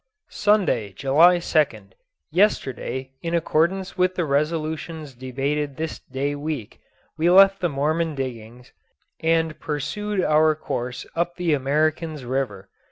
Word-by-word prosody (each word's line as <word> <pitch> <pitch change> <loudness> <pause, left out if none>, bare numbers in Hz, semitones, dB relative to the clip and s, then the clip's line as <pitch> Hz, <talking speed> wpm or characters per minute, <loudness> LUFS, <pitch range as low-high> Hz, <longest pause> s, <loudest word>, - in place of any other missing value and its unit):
Sunday, 185 - +1
July 150 - +5
2nd. 155 -3 0 0.4
Yesterday, 130 - 0
in 170 0 -2
accordance 175 +4 0
with 185 0 +2
the 175 - 0
resolutions 155 +1 -2
debated 135 +3 -3
this 160 0 -4
day 135 +2 -3
week, 145 -6 -5 0.4
we 165 +2 +3
left 195 +1 +7
the 175 - +1
Mormon 155 +3 0
diggings, 125 -2 -7 0.5
and 160 -1 +1
pursued 185 +8 -3
our 155 0 +4
course 125 -4 -4
up 175 +1 -1
the 175 -3 0
Americans' 150 +1 0
River. 120 -7 -3
155 Hz, 120 wpm, -23 LUFS, 135-170 Hz, 0.5 s, left